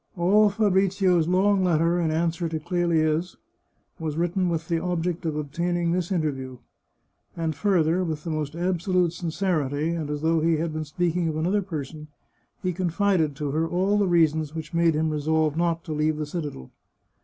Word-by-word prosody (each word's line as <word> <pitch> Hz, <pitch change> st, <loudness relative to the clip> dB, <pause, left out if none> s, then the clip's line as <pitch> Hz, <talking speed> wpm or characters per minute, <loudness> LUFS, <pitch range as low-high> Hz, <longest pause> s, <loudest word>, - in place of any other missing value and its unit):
All 205 Hz, +5 st, +4 dB
Fabrizio's 195 Hz, -4 st, +2 dB
long 190 Hz, +2 st, +3 dB
letter 170 Hz, 0 st, +2 dB
in 165 Hz, -, +1 dB
answer 165 Hz, +1 st, 0 dB
to 160 Hz, -1 st, -3 dB
Clelia's 165 Hz, 0 st, 0 dB, 0.6 s
was 155 Hz, -2 st, -3 dB
writ 170 Hz, 0 st, 0 dB
ten 185 Hz, -2 st, +1 dB
with 165 Hz, -1 st, -2 dB
the 165 Hz, -1 st, 0 dB
object 175 Hz, -1 st, -2 dB
of 155 Hz, -, -2 dB
obtaining 170 Hz, +4 st, -1 dB
this 180 Hz, +1 st, -1 dB
interview. 135 Hz, -7 st, -2 dB, 0.8 s
And 165 Hz, -1 st, -1 dB
fur 185 Hz, +1 st, +2 dB
ther, 170 Hz, +4 st, +1 dB
with 155 Hz, -3 st, -4 dB
the 165 Hz, -, -4 dB
most 155 Hz, -1 st, -3 dB
absolute 180 Hz, 0 st, 0 dB
sincerity, 160 Hz, -4 st, -1 dB
and 160 Hz, -3 st, -3 dB
as 150 Hz, 0 st, -3 dB
though 165 Hz, 0 st, +3 dB
he 165 Hz, 0 st, +2 dB
had 160 Hz, 0 st, -2 dB
been 155 Hz, 0 st, -3 dB
speaking 170 Hz, +2 st, -1 dB
of 155 Hz, -1 st, -2 dB
another 185 Hz, +6 st, +1 dB
person, 155 Hz, -4 st, -6 dB, 0.6 s
he 180 Hz, -1 st, 0 dB
confided 175 Hz, -3 st, +1 dB
to 145 Hz, -1 st, -3 dB
her 160 Hz, +3 st, 0 dB
all 190 Hz, +4 st, +1 dB
the 200 Hz, -, +2 dB
reasons 160 Hz, -3 st, +2 dB
which 160 Hz, -1 st, -6 dB
made 170 Hz, -1 st, +3 dB
him 155 Hz, +1 st, 0 dB
resolve 155 Hz, 0 st, +1 dB
not 165 Hz, 0 st, 0 dB
to -, -, -7 dB
leave 155 Hz, 0 st, 0 dB
the 155 Hz, -, -2 dB
citadel. 145 Hz, -, -6 dB
165 Hz, 180 wpm, -25 LUFS, 155-180 Hz, 0.8 s, All